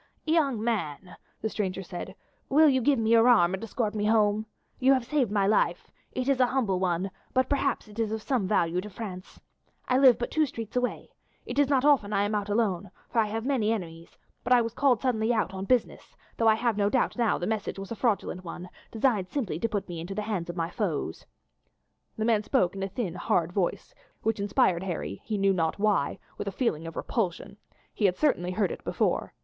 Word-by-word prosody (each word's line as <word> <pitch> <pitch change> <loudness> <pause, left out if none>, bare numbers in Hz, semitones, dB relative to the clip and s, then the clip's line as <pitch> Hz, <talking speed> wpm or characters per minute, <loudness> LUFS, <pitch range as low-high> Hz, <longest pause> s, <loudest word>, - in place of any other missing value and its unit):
"Young 285 -9 +1
man," 180 -6 -3 0.3
the 220 - 0
stranger 190 -3 -3
said, 190 +1 -7 0.3
"will 310 +3 +6
you 260 -3 +3
give 275 +3 +3
me 225 0 +1
your 230 +1 +6
arm 185 -7 +5
and 190 +3 -4
escort 220 -1 -2
me 210 -1 -1
home? 215 0 +2 0.3
You 265 +1 +5
have 255 -3 0
saved 275 -4 +1
my 200 -2 +2
life; 210 +2 +1 0.2
it 255 - -3
is 275 -2 +2
a 255 - +5
humble 225 -9 0
one, 185 +1 -1 0.2
but 260 0 +3
perhaps 275 -4 0
it 210 +1 -11
is 220 -2 0
of 220 -1 -3
some 245 -8 0
value 180 -3 +1
to 210 - -8
France. 190 -3 -8 0.5
I 255 +1 +3
live 260 -3 +7
but 240 - -4
two 310 -1 +2
streets 225 -3 -7
away. 250 0 -2 0.3
It 250 +3 -3
is 285 -2 +3
not 270 -1 +2
often 255 -9 +3
I 200 0 +2
am 205 +1 -1
out 205 -1 -1
alone, 205 -3 0 0.2
for 230 - +1
I 220 - +3
have 225 +2 -4
many 250 -6 +1
enemies, 170 -6 -6 0.3
but - - -4
I 250 - +7
was 230 -1 -2
called 255 -4 +2
suddenly 235 -3 +1
out 220 -4 0
on 190 0 -4
business, 250 +2 -1 0.2
though 225 - +2
I 220 - +6
have 230 -1 0
no 205 -1 +2
doubt 255 +3 +1
now 235 -3 +1
the 175 - -3
message 220 -1 -2
was 195 +2 -7
a - - -2
fraudulent 205 -5 -1
one, 175 +1 -8 0.2
designed 220 -5 +1
simply 210 - -3
to 230 - -1
put 205 -2 -3
me 175 -2 -6
into 175 +4 -6
the 210 - -2
hands 200 -6 -3
of 175 - -4
my 165 0 -2
foes." 165 - -3 0.9
The 220 - -1
man 225 -2 +3
spoke 210 -5 +1
in 195 - -5
a 195 - -2
thin 195 -5 -3
hard 175 -1 0
voice, 185 -3 -2 0.3
which 225 -1 0
inspired 190 -3 +2
Harry, 175 - -4
he 215 -2 -2
knew 195 0 +3
not 165 -3 0
why, 200 -8 +1 0.2
with - - -4
a - - -1
feeling 175 -7 -1
of 165 - -8
repulsion; 200 -2 -3 0.4
he 210 - 0
had 180 -2 +2
certainly 180 - +1
heard 200 -2 +1
it - - -7
before. - - -1
215 Hz, 225 wpm, -27 LUFS, 190-240 Hz, 0.9 s, live